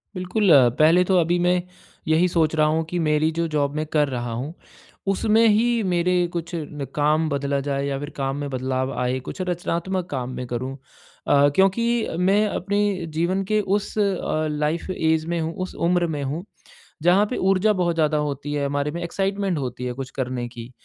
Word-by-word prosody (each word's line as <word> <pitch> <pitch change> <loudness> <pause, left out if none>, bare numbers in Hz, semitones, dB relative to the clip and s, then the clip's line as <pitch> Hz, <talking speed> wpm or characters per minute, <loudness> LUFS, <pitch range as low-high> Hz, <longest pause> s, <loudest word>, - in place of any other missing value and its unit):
बिल्कुल। 185 +2 +1 0.3
पहले 165 +4 +6
तो 185 0 +2
अभी 170 +1 +2
मैं 180 0 +3 0.5
यही 160 +3 +4
सोच 165 -3 +1
रहा 155 -1 +3
हूँ 160 +1 +1
कि 175 - -2
मेरी 150 +1 +2
जो 170 0 +1
ज़ॉब 145 -2 0
मैं 155 0 -1
कर 150 -2 +3
रहा 120 -2 -3
हूँ 130 +7 -4 0.6
उसमें 220 +3 +3
ही 215 +2 +4 0.3
मेरे 175 +1 +2 0.2
कुछ 170 -1 -4
न 150 -3 -5
काम 150 +2 +2
बदला 140 -1 -1
जाए 140 0 -2
या 140 -1 -2
फ़िर 145 +1 -5
काम 135 -1 -1
में 145 -1 -4
बदलाव 130 0 -2
आए, 125 +1 0
कुछ 130 - -7
रचनात्मक 180 +1 -2
काम 130 -3 -3
मैं 125 - -4
करूँ। 130 +3 -4 0.5
अ, 145 0 +5
क्योंकि 195 +4 +3 0.3
मैं 195 +4 +3
अपने 200 0 -1 0.4
जीवन 185 +4 +1
के 215 - +3 0.2
उस 205 +1 -4
अ, 190 -6 0
लाइफ़ 150 +5 -1
ऐज 160 -3 +1
में 170 0 -2
हूँ 160 0 -2
उस 185 - -7
उम्र 175 -1 +2
में 145 - -3
हूँ 145 +6 -3 0.6
जहाँ 180 +4 +5
पे 255 - -3
ऊर्जा 195 +3 +3
बहुत 175 -2 +1
ज़्यादा 155 -1 +2
होती 145 0 -3
हैं 145 -1 -1
हमारे 145 +1 -1
में, 170 +2 -5
एक्साइटमेंट 195 +1 -1
होती 125 -2 -4
है 125 - -2
कुछ 130 0 -6
करने 125 -2 -3
की, 120 0 -10
160 Hz, 195 wpm, -23 LUFS, 140-180 Hz, 0.6 s, पहले